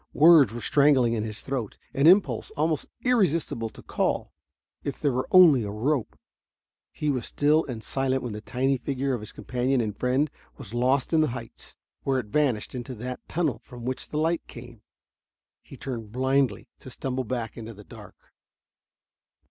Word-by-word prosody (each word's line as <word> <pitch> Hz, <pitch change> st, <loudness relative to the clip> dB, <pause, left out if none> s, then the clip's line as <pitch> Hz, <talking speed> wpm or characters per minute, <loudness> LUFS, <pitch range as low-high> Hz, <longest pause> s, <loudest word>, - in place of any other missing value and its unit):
Words 155 Hz, -6 st, +7 dB
were 120 Hz, +1 st, -6 dB
strangling 140 Hz, -5 st, +4 dB
in 110 Hz, -2 st, -1 dB
his 110 Hz, -1 st, -4 dB
throat, 130 Hz, -6 st, -4 dB, 0.2 s
an 140 Hz, +3 st, +3 dB
impulse, 170 Hz, -, +4 dB
almost 155 Hz, 0 st, 0 dB, 0.2 s
irresistible, 165 Hz, -, +1 dB
to -, -, -14 dB
call. -, -, -1 dB, 0.5 s
If 140 Hz, -, -4 dB
there 145 Hz, -, +1 dB
were 130 Hz, +1 st, -2 dB
only 170 Hz, -9 st, +7 dB
a 105 Hz, -, -4 dB
rope.... 120 Hz, +5 st, -1 dB, 0.7 s
He 150 Hz, -1 st, -1 dB
was 130 Hz, -3 st, -3 dB
still 150 Hz, +2 st, +2 dB
silent 135 Hz, +2 st, -1 dB
when 120 Hz, -3 st, -4 dB
the 105 Hz, -, -6 dB
tiny 135 Hz, +4 st, 0 dB
figure 135 Hz, +1 st, -2 dB
of 125 Hz, -, -1 dB
his 105 Hz, 0 st, -8 dB
companion 125 Hz, +1 st, -1 dB
and 110 Hz, -3 st, -2 dB
friend 130 Hz, +6 st, +1 dB, 0.3 s
was 110 Hz, -, -9 dB
lost 130 Hz, +5 st, +1 dB
in 160 Hz, -, +5 dB
the 155 Hz, -, +3 dB
heights, 115 Hz, -2 st, -12 dB, 0.3 s
where 135 Hz, -1 st, 0 dB
it 125 Hz, -, -2 dB
vanished 135 Hz, -8 st, +1 dB
into 125 Hz, 0 st, -6 dB
that 125 Hz, +3 st, -5 dB
tunnel 150 Hz, -9 st, -1 dB
from 120 Hz, -1 st, -11 dB
which 130 Hz, 0 st, -3 dB
came -, -, -30 dB
the 150 Hz, -, -2 dB
light. 165 Hz, +2 st, +1 dB, 1.2 s
He -, -, -13 dB
turned 115 Hz, -6 st, -6 dB
blindly, 130 Hz, +2 st, +1 dB
to -, -, -11 dB
stumble 130 Hz, +1 st, -3 dB
back 115 Hz, -2 st, -4 dB
into 115 Hz, -1 st, -8 dB
the 105 Hz, -, -12 dB
dark. -, -, -15 dB
130 Hz, 170 wpm, -26 LUFS, 120-145 Hz, 1.2 s, Words